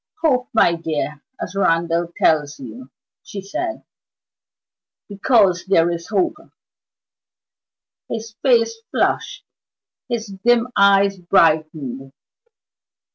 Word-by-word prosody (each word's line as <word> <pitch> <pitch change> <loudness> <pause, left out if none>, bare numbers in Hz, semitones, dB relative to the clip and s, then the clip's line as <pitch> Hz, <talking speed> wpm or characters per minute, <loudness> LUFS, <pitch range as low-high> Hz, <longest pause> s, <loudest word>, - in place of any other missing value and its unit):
"Hope, 255 -5 +2
my 195 -6 +4
dear, 155 -3 -4 0.2
as - - -6
Randal 170 -2 +1
tells 150 -1 +2
you," 125 0 -10 0.3
she 200 - -8
said, 330 - -5 1.2
"because 200 -3 +2
there 175 -3 +3
is 170 0 -5
hope." 200 +6 0 1.7
His 225 -1 -5
face 230 -4 +3 0.2
flushed, - - -1 0.6
his 235 -2 -2 0.2
dim 240 0 +3
eyes 200 -1 +4
brightened. 155 -7 +1
190 Hz, 90 wpm, -20 LUFS, 160-225 Hz, 1.7 s, my